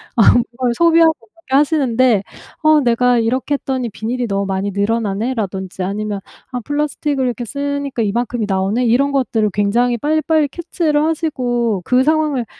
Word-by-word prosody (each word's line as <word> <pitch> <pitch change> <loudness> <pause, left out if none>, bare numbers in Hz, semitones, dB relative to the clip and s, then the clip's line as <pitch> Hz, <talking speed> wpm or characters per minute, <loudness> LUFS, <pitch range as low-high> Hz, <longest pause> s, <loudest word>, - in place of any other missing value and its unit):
아 225 - +6
그걸 240 0 0
소비하고 330 0 +5
그렇게 265 +3 -7
하시는데 255 -8 +2 0.4
"어 310 0 +5
내가 245 0 +2
이렇게 255 +5 -1
했더니 260 -3 -2
비닐이 235 +4 -3
너무 200 -1 -1
많이 195 +1 -2
늘어나네?"라던지 200 -2 -2
아니면 205 +1 -3 0.3
"아 250 - -3
플라스틱을 290 0 -2
이렇게 245 -1 -3
쓰니까 280 0 -3
이만큼이 230 +1 -1
나오네?" 195 +6 0
이런 270 +5 +2
것들을 230 -6 0
굉장히 235 +4 +1
빨리빨리 310 +2 +1
캐치를 315 -1 -1
하시고 245 - -1
그 255 +1 +3
상황을 300 -4 +1
245 Hz, 385 characters per minute, -17 LUFS, 220-285 Hz, 0.4 s, 아